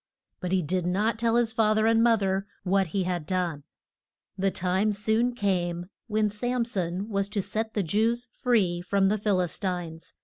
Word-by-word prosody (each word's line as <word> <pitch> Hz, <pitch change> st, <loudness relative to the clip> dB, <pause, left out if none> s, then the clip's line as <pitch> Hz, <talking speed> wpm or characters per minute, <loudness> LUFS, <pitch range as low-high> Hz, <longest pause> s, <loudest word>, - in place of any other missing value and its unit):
But 180 Hz, -2 st, -4 dB
he 190 Hz, -2 st, +2 dB
did 180 Hz, +3 st, -1 dB
not 210 Hz, +5 st, 0 dB
tell 230 Hz, 0 st, +2 dB
his 235 Hz, -2 st, +2 dB
fath 215 Hz, -2 st, +3 dB
er 215 Hz, -, +3 dB
and 225 Hz, 0 st, +4 dB
moth 230 Hz, -3 st, +4 dB
er 195 Hz, +1 st, 0 dB, 0.2 s
what 195 Hz, 0 st, +2 dB
he 190 Hz, +4 st, -1 dB
had 175 Hz, -4 st, -3 dB
done. 175 Hz, -5 st, -1 dB, 0.7 s
The 195 Hz, 0 st, +1 dB
time 185 Hz, +3 st, +1 dB
soon 220 Hz, +4 st, +1 dB
came 175 Hz, -4 st, -1 dB, 0.2 s
when 215 Hz, -1 st, +1 dB
Sam 245 Hz, +3 st, -1 dB
son 185 Hz, -2 st, -3 dB
was 200 Hz, -2 st, -1 dB
to 205 Hz, -1 st, -1 dB
set 220 Hz, +2 st, -3 dB
the 205 Hz, -, +1 dB
Jews 225 Hz, +7 st, +1 dB
free 200 Hz, -9 st, +1 dB
from 195 Hz, +2 st, +2 dB
the 210 Hz, +1 st, 0 dB
Phil 200 Hz, -2 st, +1 dB
is 175 Hz, -3 st, -4 dB
tines. 175 Hz, -4 st, -4 dB
200 Hz, 195 wpm, -27 LUFS, 180-220 Hz, 0.7 s, and